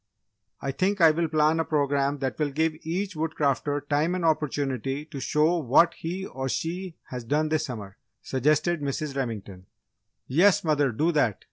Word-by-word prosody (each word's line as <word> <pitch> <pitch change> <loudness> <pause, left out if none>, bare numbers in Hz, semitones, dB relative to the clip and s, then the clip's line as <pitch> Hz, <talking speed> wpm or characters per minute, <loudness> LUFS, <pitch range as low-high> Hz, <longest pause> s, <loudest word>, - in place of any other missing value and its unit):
"I 140 - -1
think 195 +7 0
I 165 -2 +7
will 165 +2 0
plan 155 +1 +2
a - - +2
programme 140 -2 0
that 130 +1 -2
will 150 -1 +1
give 160 +3 0
each 185 +4 -3
Woodcrafter 145 -2 -1
time 155 +5 +1
and 180 -2 -2
opportunity 140 -3 -1
to 150 -3 -8
show 155 +6 +2
what 160 +5 +4
he 180 +4 -5
or 130 -5 -4
she 175 +4 -3 0.2
has 125 -1 -5
done 150 +6 0
this 155 0 0
summer," 105 -8 -7 0.3
suggested 155 +5 +1
Mrs. 140 0 -3
Remington. 105 -8 -5 0.6
"Yes, 175 +9 +4
mother, 145 -4 +2
do 155 +10 +1
that!" 135 - +1
150 Hz, 165 wpm, -26 LUFS, 135-165 Hz, 0.6 s, I